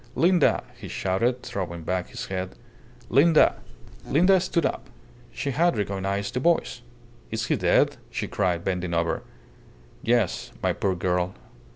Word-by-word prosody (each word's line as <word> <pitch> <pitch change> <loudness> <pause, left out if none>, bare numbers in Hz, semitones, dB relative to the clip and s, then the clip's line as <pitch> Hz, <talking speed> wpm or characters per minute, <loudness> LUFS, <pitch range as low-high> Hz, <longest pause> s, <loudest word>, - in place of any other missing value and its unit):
"Linda!" 175 -1 +3
he 120 -5 -9
shouted, 115 +8 0
throwing 85 -4 -4
back 90 +2 -2
his 125 -1 -6
head. 95 -2 -4 0.5
"Linda!" 155 +5 +5 0.5
Linda 185 +6 +4
stood 170 -3 0
up. - - -3 0.4
She 140 - -3
had 170 +2 +2
recognized 100 +1 -2
the 125 - 0
voice. 165 -4 +1 0.5
"Is 110 +1 -2
he - - +1
dead?" - - +3
she - - -3
cried, 85 -2 0
bending 90 -2 -1
over. 85 0 0 0.8
"Yes, 120 -4 0
my - - +2
poor 95 -2 0
girl. 90 +1 -1
100 Hz, 140 wpm, -25 LUFS, 90-135 Hz, 0.8 s, Linda